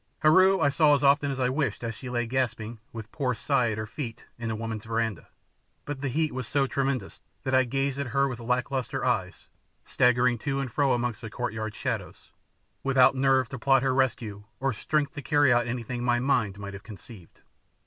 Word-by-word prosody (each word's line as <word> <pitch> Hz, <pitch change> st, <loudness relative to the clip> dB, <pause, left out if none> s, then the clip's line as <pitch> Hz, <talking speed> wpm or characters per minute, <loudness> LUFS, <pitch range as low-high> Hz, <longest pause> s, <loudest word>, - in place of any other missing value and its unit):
Heru 185 Hz, +5 st, +5 dB
I 145 Hz, -, +3 dB
saw 150 Hz, +1 st, +4 dB
as 140 Hz, -, -2 dB
often 140 Hz, +1 st, +4 dB
as 135 Hz, -1 st, -3 dB
I 125 Hz, -1 st, +2 dB
wished 140 Hz, -1 st, -1 dB
as 115 Hz, 0 st, -3 dB
she 125 Hz, +3 st, -8 dB
lay 120 Hz, -1 st, -1 dB
gasping, 115 Hz, -2 st, -2 dB
with 110 Hz, -1 st, -8 dB
poor 130 Hz, -4 st, -1 dB
Si 140 Hz, -, -4 dB
at 120 Hz, -5 st, +2 dB
her 110 Hz, -, -3 dB
feet, 115 Hz, +1 st, -7 dB
in 115 Hz, -, -4 dB
the 110 Hz, -, -2 dB
women's 110 Hz, -1 st, -5 dB
verandah; 115 Hz, -3 st, -2 dB, 0.6 s
but 145 Hz, -2 st, -5 dB
the 140 Hz, -, -1 dB
heat 155 Hz, +3 st, 0 dB
was 130 Hz, -2 st, -4 dB
so 140 Hz, -2 st, +1 dB
tremendous 135 Hz, -6 st, -2 dB, 0.2 s
that 130 Hz, -, -2 dB
I 130 Hz, 0 st, +5 dB
gazed 135 Hz, +2 st, -1 dB
at 140 Hz, -, -2 dB
her 140 Hz, +3 st, +2 dB
with 125 Hz, -3 st, -5 dB
lack 125 Hz, +2 st, -1 dB
lustre 130 Hz, -3 st, -2 dB
eyes, -, -, -2 dB, 0.4 s
staggering 125 Hz, -1 st, +3 dB
to 140 Hz, +3 st, -2 dB
and 135 Hz, -3 st, -3 dB
fro 140 Hz, +2 st, +2 dB
amongst 120 Hz, -2 st, -2 dB
the 115 Hz, -, -6 dB
courtyard 110 Hz, -1 st, -4 dB
shadows, 115 Hz, -8 st, -5 dB, 0.5 s
without 135 Hz, -1 st, +5 dB
nerve 130 Hz, -1 st, +2 dB
to 135 Hz, -, -6 dB
plot 135 Hz, +1 st, +3 dB
her 135 Hz, -1 st, +2 dB
rescue 115 Hz, -6 st, -1 dB
or 135 Hz, 0 st, 0 dB
strength 150 Hz, +7 st, -1 dB
to 145 Hz, -, -6 dB
carry 145 Hz, -2 st, +4 dB
out 120 Hz, 0 st, +2 dB
anything 120 Hz, 0 st, -4 dB
my 120 Hz, 0 st, +2 dB
mind 120 Hz, -7 st, +1 dB
might 100 Hz, 0 st, -7 dB
have 100 Hz, -, -8 dB
conceived. 105 Hz, -3 st, -13 dB
125 Hz, 210 wpm, -27 LUFS, 115-140 Hz, 0.6 s, Heru